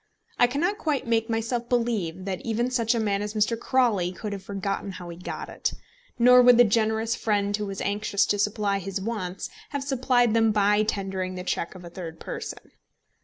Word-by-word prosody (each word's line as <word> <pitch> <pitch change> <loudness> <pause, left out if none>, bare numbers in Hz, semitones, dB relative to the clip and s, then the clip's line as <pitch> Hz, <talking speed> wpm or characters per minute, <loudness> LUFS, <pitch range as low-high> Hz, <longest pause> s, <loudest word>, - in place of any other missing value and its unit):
I 245 - +6
cannot 345 - -1
quite 300 -4 -1
make 225 0 +1
myself 230 +1 -2
believe 210 -8 -1
that 190 -2 -3
even 235 +2 -1
such 235 -1 +1
a - - +1
man 205 -2 0
as 210 +1 -4
Mr. 215 +2 +2
Crawley 230 -7 +1
could 205 +3 -5
have 195 - -6
forgotten 195 0 -3
how 175 -1 -8
he 170 - -7
got 180 - -6
it; - - -2 0.4
nor 250 +1 +7
would 245 -1 +7
the 245 - +8
generous 220 +1 +1
friend 205 -2 0
who 210 0 -3
was 195 -1 -5
anxious 200 0 +1
to 205 - 0
supply 205 -1 +1
his 195 +1 -4
wants 190 -3 -4 0.2
have 285 -2 -3
supplied 255 -4 +2
them 225 -1 +4
by 210 0 +3
tendering 190 -3 -2
the 180 - -5
cheque 175 0 -2
of 180 -1 -10
a - - -8
third 165 -2 -8
person. - - -7
210 Hz, 200 wpm, -26 LUFS, 195-235 Hz, 0.4 s, the